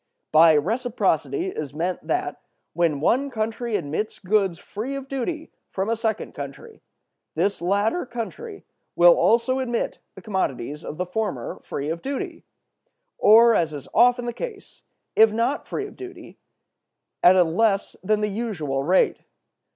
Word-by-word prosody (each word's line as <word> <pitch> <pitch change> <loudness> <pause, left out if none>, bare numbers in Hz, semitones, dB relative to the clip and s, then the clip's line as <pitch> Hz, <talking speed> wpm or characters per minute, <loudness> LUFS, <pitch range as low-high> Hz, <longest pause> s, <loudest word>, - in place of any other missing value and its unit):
By 160 +1 +7
"reciprocity" 245 - 0
is 150 - -6
meant 175 +3 -3
that, - - -2 0.3
when 160 -4 +1
one 265 - +2
country 225 -1 -2
admits 165 +7 -3
goods 195 -3 +1
free 225 +9 -6
of 275 -1 -6
duty 300 +5 -4 0.2
from 195 +3 -2
a - - +2
second 220 -2 -2
country, 140 -2 -9 0.5
this 190 +5 0
latter 205 - 0
country 395 - -7 0.3
will - - +8
also 240 - +2
admit 240 -3 -2 0.2
the 190 - -11
commodities 150 - -3
of 155 - -7
the 180 - -1
former 185 - -3
free 145 +2 -4
of 165 +1 -3
duty; 275 0 -5 0.8
or, 230 +2 +7
as 165 -6 +1
is 140 - -8
often 245 0 +4
the 240 - -3
case, 435 - -8 0.3
if 220 0 +6
not 235 +6 -1
free 410 - -3
of 415 - -11
duty, 375 -1 -11 0.8
at 180 +1 +7
a 185 - +6
less 195 +4 +1
than 210 +2 +1
the 210 - +1
usual 195 -11 -3
rate. 180 +6 +3
215 Hz, 150 wpm, -24 LUFS, 170-245 Hz, 0.8 s, will